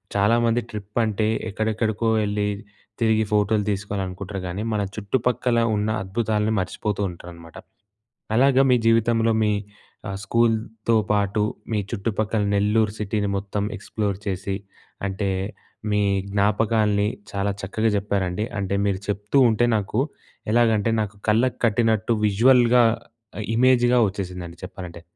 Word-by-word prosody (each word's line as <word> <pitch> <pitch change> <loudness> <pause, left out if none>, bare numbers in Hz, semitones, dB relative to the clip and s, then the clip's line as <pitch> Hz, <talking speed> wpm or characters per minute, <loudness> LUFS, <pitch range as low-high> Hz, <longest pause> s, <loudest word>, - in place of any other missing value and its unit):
చాలామంది 115 +3 +3
ట్రిప్ 105 -1 -8
అంటే 110 0 0 0.2
ఎక్కడెక్కడికో 110 +1 -1 0.2
ఎళ్లి 105 0 -1 0.5
తిరిగి 110 -1 +3
ఫోటోలు 105 0 +2
తీసుకోవాలనుకుంటారు 100 -1 -4
గాని 95 +4 -4
మన 105 - 0
చుట్టుపక్కల 120 +3 0 0.2
ఉన్న 105 +1 0
అద్భుతాలని 105 +2 0
మర్చిపోతూ 105 +2 -3
ఉంటారనమాట. 85 -2 -11 0.8
అలాగా 135 +1 +5
మీ - - +6
జీవితంలో 115 0 +3
మీ 105 - +2 0.6
ఆహ్, 95 - -4
స్కూల్‌తో 115 +1 +1 0.2
పాటు 105 0 +1 0.3
మీ 110 - +1
చుట్టుపక్కల 110 +1 -1
నెల్లూరు 105 +1 +2
సిటీని 105 -1 -1
మొత్తం 100 +1 -3
ఎక్స్‌ప్లోర్ 100 -1 -3
చేసి 95 0 -2 0.5
అంటే 100 +1 -2 0.6
మీ 105 0 +2 0.3
జ్ఞాపకాల్ని 105 0 +2 0.2
చాలా 100 0 0
చక్కగా 110 +3 0
చెప్పారండి. 100 -1 -1
అంటే 100 0 -1
మీరు 95 -1 0
చెప్తూ 105 +5 0
ఉంటే 110 +2 +2
నాకు 105 +3 -1 0.5
ఎలాగంటే 115 -2 +3
నాకు 105 -1 -3
కళ్ళకు 115 +4 +2
కట్టినట్టు 110 0 +1
విజువల్‍గా 120 +3 +5 0.7
ఇమేజ్‍‌గా 125 0 +4
వచ్చేసిందండి 90 -3 -6
చెప్పాలంటే. 90 -3 -9
105 Hz, 115 wpm, -23 LUFS, 100-115 Hz, 0.8 s, మీ